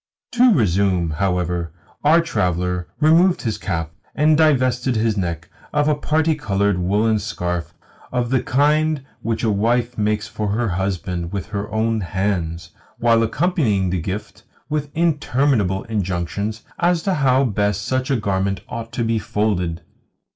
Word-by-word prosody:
To 250 Hz, 0 st, +5 dB
resume, 95 Hz, -, +2 dB
however 90 Hz, -1 st, -1 dB, 0.3 s
our 160 Hz, +3 st, +5 dB
traveller 90 Hz, -, -1 dB
removed 165 Hz, +4 st, +4 dB
his 110 Hz, -3 st, -2 dB
cap, 80 Hz, -1 st, -3 dB, 0.2 s
and 155 Hz, +1 st, +4 dB
divested 130 Hz, -5 st, +2 dB
his 110 Hz, -1 st, +1 dB
neck 85 Hz, -4 st, -3 dB, 0.3 s
of 150 Hz, 0 st, +2 dB
a 150 Hz, -, +4 dB
parti 155 Hz, +2 st, +1 dB
coloured 100 Hz, -9 st, 0 dB
woollen 105 Hz, +4 st, +2 dB
scarf 90 Hz, -5 st, -4 dB, 0.4 s
of 125 Hz, -1 st, -1 dB
the 130 Hz, -2 st, +3 dB
kind 150 Hz, +2 st, +2 dB, 0.2 s
which 115 Hz, -1 st, -2 dB
a 110 Hz, -, +2 dB
wife 120 Hz, +3 st, 0 dB
makes 105 Hz, 0 st, 0 dB
for 105 Hz, -, -3 dB
her 110 Hz, +3 st, 0 dB
husband 90 Hz, -2 st, -2 dB
with 100 Hz, 0 st, -4 dB
her 105 Hz, 0 st, -4 dB
own 110 Hz, +1 st, 0 dB
hands, 90 Hz, -3 st, -2 dB, 0.3 s
while 115 Hz, -1 st, +3 dB
accompanying 115 Hz, -, +1 dB
the 90 Hz, -2 st, -1 dB
gift 95 Hz, +6 st, -5 dB, 0.3 s
with 150 Hz, -1 st, -2 dB
interminable 135 Hz, -, +1 dB
injunctions 100 Hz, 0 st, -3 dB, 0.2 s
as 175 Hz, -1 st, +2 dB
to 195 Hz, -, +1 dB
how 135 Hz, -4 st, +3 dB
best 105 Hz, -4 st, 0 dB
such 130 Hz, +4 st, -1 dB
a 135 Hz, -, +2 dB
garment 100 Hz, -3 st, -1 dB
ought 115 Hz, 0 st, -6 dB
to 120 Hz, -1 st, -1 dB
be 115 Hz, 0 st, +1 dB
folded. 90 Hz, -6 st, -1 dB
110 Hz, 145 wpm, -21 LUFS, 95-135 Hz, 0.4 s, To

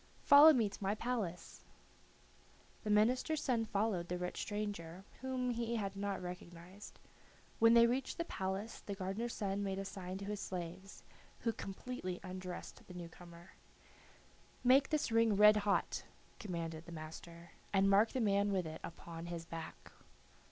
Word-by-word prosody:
"Follow 290 Hz, +3 st, +10 dB
me 240 Hz, -7 st, +3 dB
to 200 Hz, -, -9 dB
my 200 Hz, +1 st, 0 dB
palace." 215 Hz, -8 st, -4 dB, 1.2 s
The 215 Hz, -, -3 dB
minister's 250 Hz, +9 st, +3 dB
son 235 Hz, -4 st, +1 dB
followed 205 Hz, -5 st, 0 dB
the 180 Hz, -, -2 dB
rich 180 Hz, 0 st, -4 dB
stranger, 200 Hz, -4 st, -4 dB, 0.2 s
whom 255 Hz, -1 st, -1 dB
he 235 Hz, 0 st, -2 dB
had 200 Hz, -3 st, -2 dB
not 200 Hz, 0 st, -2 dB
recognized. 180 Hz, +2 st, -9 dB, 0.6 s
When 230 Hz, +1 st, +7 dB
they 235 Hz, 0 st, +8 dB
reached 250 Hz, +3 st, -1 dB
the 335 Hz, -, -2 dB
palace 195 Hz, -, -4 dB
the 200 Hz, -, -6 dB
gardener's 195 Hz, +5 st, -3 dB
son 200 Hz, -1 st, -1 dB
made 195 Hz, -1 st, -2 dB
a 195 Hz, -, -3 dB
sign 190 Hz, -1 st, -6 dB
to 200 Hz, -, -6 dB
his 205 Hz, 0 st, -3 dB
slaves, 185 Hz, +1 st, -6 dB, 0.4 s
who 230 Hz, -, 0 dB
completely 195 Hz, -2 st, -5 dB
undressed 185 Hz, -1 st, -7 dB
the 180 Hz, -, -10 dB
new 175 Hz, -1 st, -6 dB
comer. 170 Hz, +1 st, -14 dB, 1.1 s
"Make 265 Hz, +2 st, +5 dB
this 305 Hz, -5 st, 0 dB
ring 225 Hz, -2 st, +4 dB
red 210 Hz, +1 st, +8 dB
hot," 205 Hz, -1 st, 0 dB, 0.4 s
commanded 165 Hz, -4 st, -5 dB
the -, -, -8 dB
master, 170 Hz, +1 st, -9 dB, 0.2 s
"and 195 Hz, 0 st, +4 dB
mark 200 Hz, +3 st, +5 dB
the 260 Hz, -, -2 dB
man 200 Hz, -1 st, +2 dB
with 185 Hz, -3 st, 0 dB
it 160 Hz, 0 st, -7 dB
upon 170 Hz, 0 st, -8 dB
his 170 Hz, -1 st, -5 dB
back." 165 Hz, -1 st, -8 dB
195 Hz, 160 wpm, -36 LUFS, 180-225 Hz, 1.2 s, Follow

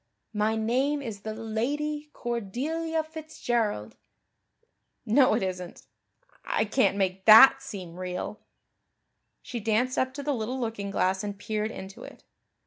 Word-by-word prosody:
My 215 Hz, +1 st, +1 dB
name 260 Hz, +6 st, 0 dB
is 215 Hz, -5 st, -6 dB
the 215 Hz, +1 st, -5 dB
Lady 290 Hz, +7 st, -2 dB
Cordelia 290 Hz, +9 st, -2 dB
Fitzgerald. 240 Hz, -, -3 dB, 1.1 s
No, 245 Hz, +1 st, +4 dB
it 220 Hz, -, 0 dB
isn't 180 Hz, -2 st, -5 dB, 0.6 s
I -, -, 0 dB
can't 220 Hz, -1 st, +2 dB
make 190 Hz, -1 st, -1 dB
that 265 Hz, +5 st, +9 dB
seem 190 Hz, -10 st, -8 dB
real." 180 Hz, +3 st, -5 dB, 1.0 s
She 240 Hz, -, -5 dB
danced 230 Hz, +4 st, +1 dB
up 260 Hz, 0 st, +1 dB
to 285 Hz, -, -5 dB
the 290 Hz, 0 st, 0 dB
little 245 Hz, +2 st, -3 dB
looking 225 Hz, -4 st, -3 dB
glass 190 Hz, 0 st, 0 dB
and 205 Hz, -1 st, -4 dB
peered 215 Hz, +1 st, -2 dB
into 195 Hz, -3 st, -9 dB
it. -, -, -12 dB
225 Hz, 135 wpm, -27 LUFS, 200-270 Hz, 1.1 s, that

